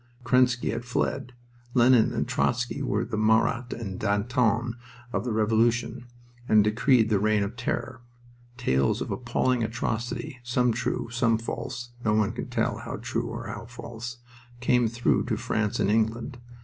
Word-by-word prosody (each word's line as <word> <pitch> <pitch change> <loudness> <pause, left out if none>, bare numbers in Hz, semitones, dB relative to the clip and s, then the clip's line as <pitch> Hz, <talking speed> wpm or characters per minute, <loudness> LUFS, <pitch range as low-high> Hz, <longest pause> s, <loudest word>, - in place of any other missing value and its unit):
Kerensky 125 -1 +3
had 115 +2 -3
fled. 125 +1 -2 0.4
Lenin 120 -2 +5
and - - -1
Trotzky 125 +3 0
were 115 -5 0
the 110 - -4
Marat 110 +2 +2
and 100 -5 -5
Danton 115 +3 +1 0.4
of - - -1
the 125 - -1
Revolution, 115 +2 +1 0.4
and 105 -1 +6
decreed 115 +2 +3
the 105 -3 +3
Reign 105 0 +2
of 100 +4 -4
Terror. 120 0 -3 0.6
Tales 65 - +1
of - - -3
appalling 125 -2 0
atrocity, 120 +2 -3
some 125 0 +2
true, 115 - -2
some 120 -1 +2
false 120 +2 -5
(no 105 -1 +2
one 110 -2 +2
can - - -5
tell - - -1
how - - -5
true - - -3
or - - -6
how - - -6
false), 120 +1 -7 0.4
came 125 -1 +3
through 115 +1 +1
to 115 -3 -1
France 110 -3 -1
and 100 - +2
England. 115 +3 0
115 Hz, 155 wpm, -27 LUFS, 110-125 Hz, 0.6 s, and